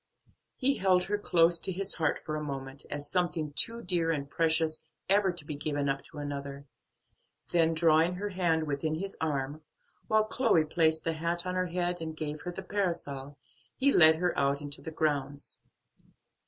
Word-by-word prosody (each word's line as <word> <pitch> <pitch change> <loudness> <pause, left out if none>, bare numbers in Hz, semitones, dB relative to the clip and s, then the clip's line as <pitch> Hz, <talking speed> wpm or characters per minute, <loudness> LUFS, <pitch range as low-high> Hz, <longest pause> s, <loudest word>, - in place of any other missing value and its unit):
He 275 +1 +2
held 185 -1 +3
her 205 +2 -1
close 170 -3 +3
to 190 - 0
his 195 +2 +1
heart 160 -3 0
for 155 - -5
a 155 - -3
moment, 135 -1 -6
as 145 0 -5
something 160 -4 0
too 230 +9 +1
dear 175 -3 +1
and 145 -4 -1
precious 160 0 +1 0.2
ever 195 -1 +3
to 175 -4 -8
be 150 - -5
given 145 -1 -2
up 135 0 -1
to 160 - -10
another, 140 -1 -5 0.9
then 165 -1 +3
drawing 165 +2 +3
her 205 +3 -3
hand 170 -4 +1
within 150 +2 -2
his 195 +4 -4
arm, 145 -1 -2 0.5
while 215 0 +4
Chloe 215 -7 +2
placed 160 0 +2
the 165 - 0
hat 170 +2 -1
on 180 - -2
her 185 0 0
head, 175 0 -2
and 160 -1 -5
gave 150 -1 -4
her 180 - -5
the - - -7
parasol, 145 -8 -3 0.4
he 275 +1 +3
led 160 -2 +8
her 175 +1 0
out 140 0 +1
into 145 0 -5
the 160 - -6
grounds. 145 -3 -2
160 Hz, 180 wpm, -30 LUFS, 145-180 Hz, 0.9 s, led